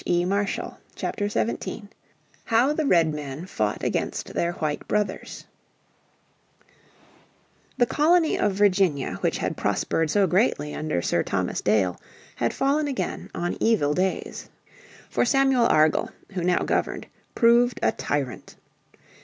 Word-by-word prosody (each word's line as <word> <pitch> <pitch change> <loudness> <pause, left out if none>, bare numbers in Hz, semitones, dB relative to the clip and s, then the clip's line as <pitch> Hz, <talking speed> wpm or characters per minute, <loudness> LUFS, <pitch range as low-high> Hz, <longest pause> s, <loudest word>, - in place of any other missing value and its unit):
__________ 190 +3 0 0.2
Chapter 205 -1 -2
17 215 0 -3 0.6
How 245 +5 +3
the 305 -1 -1
Redmen 155 - +1
Fought 105 - -2
Against - - -2
Their 170 0 0
White 150 -3 -3
Brothers 210 -1 -2 2.3
The 245 - +4
Colony 320 +5 +3
of 205 - +1
Virginia 185 - +2
which - - 0
had - - -2
prospered 165 -1 0
so 200 +4 +3
greatly 180 - +1
under 155 - -2
Sir - - +1
Thomas - - -2
Dale 100 -4 +1 0.4
had 120 -1 0
fallen 290 +2 +1
again 270 -3 -4
on 175 0 -2
evil 185 -11 +2
days. 185 +3 -2 0.6
For - - 0
Samuel 265 -2 +3
Argall, 155 0 +3 0.2
who 185 -3 -3
now 180 0 +2
governed, - - -1 0.3
proved 240 0 +4
a - - +4
tyrant. 135 -5 -4
190 Hz, 120 wpm, -25 LUFS, 150-235 Hz, 2.3 s, The